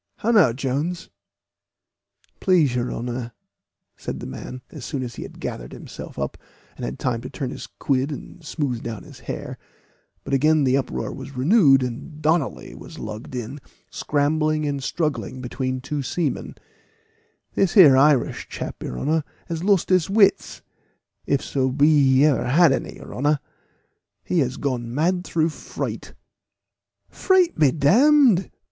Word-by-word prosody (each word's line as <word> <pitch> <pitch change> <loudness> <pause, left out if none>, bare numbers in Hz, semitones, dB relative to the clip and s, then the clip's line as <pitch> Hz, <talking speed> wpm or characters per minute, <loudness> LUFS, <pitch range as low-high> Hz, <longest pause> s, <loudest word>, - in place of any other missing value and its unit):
"How 230 - 0
now, 205 - +6
Jones?" 140 +7 -3 1.3
"Please 170 - +3
your 125 0 -1
honor," 120 0 -4 0.6
said - - -6
the - - -7
man, 125 0 -8
as 150 -6 -9
soon 130 +1 -3
as 120 -1 -6
he - - -8
had - - -9
gathered - - -6
himself - - -10
up, - - -4 0.4
and - - -9
had 65 +2 -4
time 120 -3 -1
to - - -7
turn 135 -4 -4
his - - -8
quid 135 +1 -1
and 160 +4 -9
smooth 140 -6 -3
down 115 -3 -6
his - - -13
hair; - - -6 0.6
but - - -5
again 155 +2 +4
the 130 -1 +3
uproar 135 -2 -2
was 135 -1 -9
renewed, 140 - +5
and 125 +5 -6
Donnally 155 -2 0
was - - -11
lugged 110 +4 -7
in, 125 +4 -5 0.3
scrambling 155 +1 0
and 140 -1 -2
struggling 145 -3 -2
between 130 +1 -3
two 145 +2 -3
seamen 145 +2 -2 1.0
"this 195 -3 +1
here 160 -10 +9
Irish 135 -2 +3
chap, - - -6
your 65 - -5
honor, 155 - 0 0.3
has 165 0 -3
lost 195 -2 +2
his 185 -2 +3
wits, 200 0 +2 0.6
if 140 - +1
so 130 -1 0
be 145 0 +4
he 135 +3 +5
ever 140 -6 +2
had 155 +4 +5
any, 135 - -2
your - - -11
honor. 145 +3 +1 0.8
He 180 - 0
has 130 -3 0
gone 125 -4 -3
mad 175 +4 +1
through 165 -2 0
fright." 155 - -6 0.9
"Fright 375 -3 +2
be 150 -3 +6
d 145 -1 -4 0.5
d!" 180 +1 -2
140 Hz, 155 wpm, -23 LUFS, 130-160 Hz, 1.3 s, here